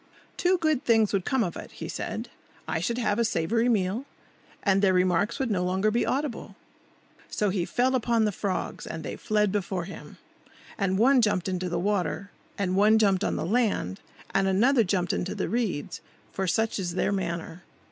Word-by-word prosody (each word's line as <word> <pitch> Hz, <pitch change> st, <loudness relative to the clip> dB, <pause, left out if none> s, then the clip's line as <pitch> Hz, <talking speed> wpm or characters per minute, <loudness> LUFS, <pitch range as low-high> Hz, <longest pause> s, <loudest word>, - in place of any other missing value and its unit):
"Two 365 Hz, +1 st, +2 dB
good 310 Hz, -5 st, +1 dB
things 225 Hz, -5 st, +3 dB
would 195 Hz, -3 st, 0 dB
come 265 Hz, -3 st, +2 dB
of 175 Hz, -4 st, -3 dB
it," -, -, -9 dB
he -, -, -7 dB
said. -, -, -4 dB, 0.4 s
"I -, -, -1 dB
should 230 Hz, +8 st, -1 dB
have 225 Hz, -3 st, 0 dB
a -, -, +4 dB
savoury 225 Hz, +5 st, +1 dB
meal, 210 Hz, +3 st, 0 dB, 0.6 s
and 195 Hz, -1 st, +3 dB
their 190 Hz, -2 st, +4 dB
remarks 180 Hz, +3 st, +2 dB
would 260 Hz, -4 st, -1 dB
no 180 Hz, -3 st, +1 dB
longer 190 Hz, +4 st, +1 dB
be 235 Hz, -, +1 dB
audible." 275 Hz, -3 st, -2 dB, 0.7 s
So 210 Hz, -2 st, 0 dB
he 185 Hz, -3 st, -1 dB
fell 255 Hz, +6 st, +1 dB
upon 235 Hz, -3 st, +2 dB
the 210 Hz, -, +1 dB
frogs, 195 Hz, -1 st, -3 dB
and 160 Hz, -, -6 dB
they -, -, -5 dB
fled 210 Hz, -2 st, +1 dB
before 190 Hz, -3 st, -2 dB
him. 195 Hz, -, -10 dB, 0.6 s
And 190 Hz, -2 st, 0 dB
one 255 Hz, +4 st, +5 dB
jumped 205 Hz, -5 st, +1 dB
into 185 Hz, -1 st, -2 dB
the 175 Hz, -, -1 dB
water, 200 Hz, +1 st, -1 dB, 0.3 s
and 185 Hz, -2 st, 0 dB
one 210 Hz, +3 st, +5 dB
jumped 200 Hz, -4 st, +3 dB
on -, -, 0 dB
the -, -, -2 dB
land, 200 Hz, -, 0 dB, 0.3 s
and 195 Hz, 0 st, +2 dB
another 230 Hz, +6 st, +4 dB
jumped 180 Hz, -2 st, 0 dB
into 185 Hz, -, -2 dB
the -, -, -2 dB
reeds; 215 Hz, -11 st, -2 dB, 0.3 s
for 190 Hz, -1 st, -2 dB
such 220 Hz, +3 st, 0 dB
is 175 Hz, -2 st, -3 dB
their 190 Hz, -, +1 dB
manner. 170 Hz, -3 st, -3 dB
200 Hz, 190 wpm, -27 LUFS, 185-230 Hz, 0.7 s, one